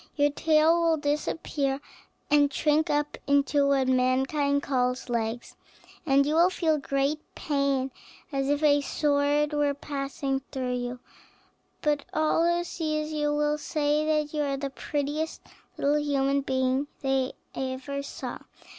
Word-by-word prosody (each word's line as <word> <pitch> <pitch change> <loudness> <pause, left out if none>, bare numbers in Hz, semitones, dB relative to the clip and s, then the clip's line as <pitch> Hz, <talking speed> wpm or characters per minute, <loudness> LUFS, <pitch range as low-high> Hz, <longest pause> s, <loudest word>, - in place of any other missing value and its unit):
Your 290 -1 +3
tail 315 +3 +3
will 330 -1 +3
then 290 -1 0
disappear, 280 -2 -2 0.5
and 290 -1 +5
shrink 305 +3 +2
up 295 0 -1
into 280 0 +3
what 270 -2 +2
mankind 265 +3 +2
calls 250 -1 -1
legs, 235 0 -2 0.5
and 275 0 +4
you 295 - 0
will 340 +3 +5
feel 320 -4 +1
great 275 +2 0 0.2
pain, 275 -3 0 0.4
as 275 -1 -1
if 290 +1 +1
a 290 -1 +5
sword 290 +1 +1
were 290 -1 +1
passing 275 -1 -3
through 255 -2 -2
you. 245 0 -4 0.8
But 295 -2 +1
all 310 +1 +2
who 345 0 +2
see 310 -3 -2
you 305 -1 -1
will 295 0 +1
say 300 0 0
that 305 -1 0
you 300 - 0
are 280 -1 -1
the 275 0 -4
prettiest 295 +3 -3 0.3
little 290 +2 +2
human 280 -1 +1
being 260 +1 0
they 270 -1 0 0.2
ever 265 +2 -4
saw. 280 - -6
285 Hz, 145 wpm, -27 LUFS, 270-300 Hz, 0.8 s, and